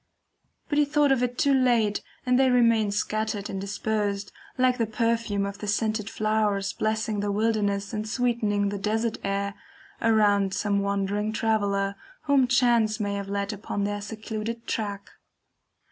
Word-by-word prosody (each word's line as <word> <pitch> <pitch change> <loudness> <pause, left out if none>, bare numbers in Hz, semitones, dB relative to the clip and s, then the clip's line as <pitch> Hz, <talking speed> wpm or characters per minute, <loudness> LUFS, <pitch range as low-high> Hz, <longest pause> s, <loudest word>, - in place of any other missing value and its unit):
But 295 -2 +1
he 295 - +5
thought 290 -1 +2
of 265 -2 +3
it 245 0 -1
too 285 -3 +3
late, 240 -6 +2 0.2
and 250 0 +3
they 265 -1 +5
remain 230 -4 +4
scattered 215 0 -2
and 195 -1 -4
dispersed, 205 0 -2 0.3
like 255 0 +2
the 230 - +1
perfume 230 -2 0
of 200 0 -6
the 210 - -5
scented 215 0 0
flowers 215 -3 0
blessing 215 -1 -1
the 205 0 -1
wilderness 205 -1 0
and 215 0 -3
sweetening 215 -4 +1
the 200 0 -4
"desert 220 +3 -1
air" 200 0 -1 0.5
around 205 -4 +3
some 200 -1 0
wandering 200 +1 -1
traveller, 205 -3 0 0.3
whom 280 -3 +3
chance 240 -3 +3
may 205 -1 -1
have 200 -1 -4
led 200 +1 -2
upon 205 0 -4
their 205 0 -2
secluded 220 +2 -5
track. 200 -2 -3
215 Hz, 155 wpm, -26 LUFS, 200-230 Hz, 0.5 s, he